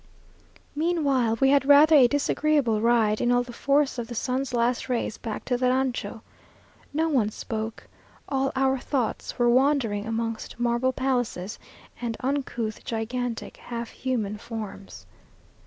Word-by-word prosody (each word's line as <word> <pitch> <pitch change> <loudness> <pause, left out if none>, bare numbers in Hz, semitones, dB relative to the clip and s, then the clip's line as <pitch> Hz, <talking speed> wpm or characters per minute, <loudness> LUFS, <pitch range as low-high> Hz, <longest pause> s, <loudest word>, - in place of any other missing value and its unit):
Meanwhile, 285 -8 +1
we 270 - +4
had 280 -1 +4
rather 295 +2 +7
a 265 -4 +8
disagreeable 285 -4 +1
ride, 225 -2 +3
in 240 - +2
all 245 0 +3
the 245 0 -10
force 275 +1 +1
of 235 - -4
the 240 - -7
sun's 255 +3 -1
last 240 +1 0
rays, 235 -3 -2
back 225 -3 -5
to 245 - 0
the 250 0 +2
rancho. 250 -4 -1 0.7
No 320 +3 +1
one 255 -9 +2
spoke 220 +1 -5 0.4
all 270 -1 0
our 265 0 +2
thoughts 250 -3 -2
were 240 -1 +3
wandering 240 -5 +2
amongst 225 0 -4
marble 240 +2 +1
palaces, 245 -7 -2 0.4
and 230 -2 -3
uncouth, 255 -5 -3
gigantic, 235 +1 -4
half 235 -1 -6
human 220 -5 -3
forms. 200 - -8
245 Hz, 140 wpm, -26 LUFS, 225-270 Hz, 0.7 s, a